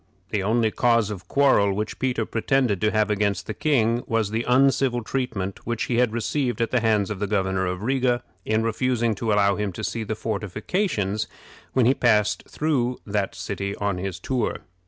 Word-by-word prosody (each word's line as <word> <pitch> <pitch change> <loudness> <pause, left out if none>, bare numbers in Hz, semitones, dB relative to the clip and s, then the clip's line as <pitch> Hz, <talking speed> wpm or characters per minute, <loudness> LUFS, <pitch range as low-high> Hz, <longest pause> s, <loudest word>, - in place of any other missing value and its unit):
The 105 - 0
only 110 +2 +2
cause 115 -3 +2
of 90 -4 -7
quarrel 130 -8 +3
which 105 +2 -4
Peter 125 -4 0
pretended 115 -4 +1
to 110 - +3
have 110 0 +1
against 100 -1 0
the 110 - -4
king 120 -4 +1
was 115 -3 0
the 115 +2 -1
uncivil 130 -1 +3
treatment 110 -7 -3
which 120 -2 -1
he 120 - -1
had 125 -2 +3
received 120 +3 -1
at 115 - 0
the 125 - +3
hands 110 -3 +1
of 100 - -4
the 105 - -1
Governor 95 -2 0
of 90 +2 -3
Riga 125 -1 +1 0.2
in 110 +2 +1
refusing 115 0 +1
to 110 +2 -2
allow 100 -1 +3
him 105 -2 -1
to 110 - -7
see 110 +5 -2
the 110 +1 -3
fortifications 105 - -2 0.5
when 130 -3 +3
he 130 - +5
passed 105 -5 +2
through 130 -5 0
that 100 -2 -1
city 100 0 -4
on 100 -3 -2
his 95 -1 -4
tour. 125 +3 -2
110 Hz, 190 wpm, -24 LUFS, 100-125 Hz, 0.5 s, he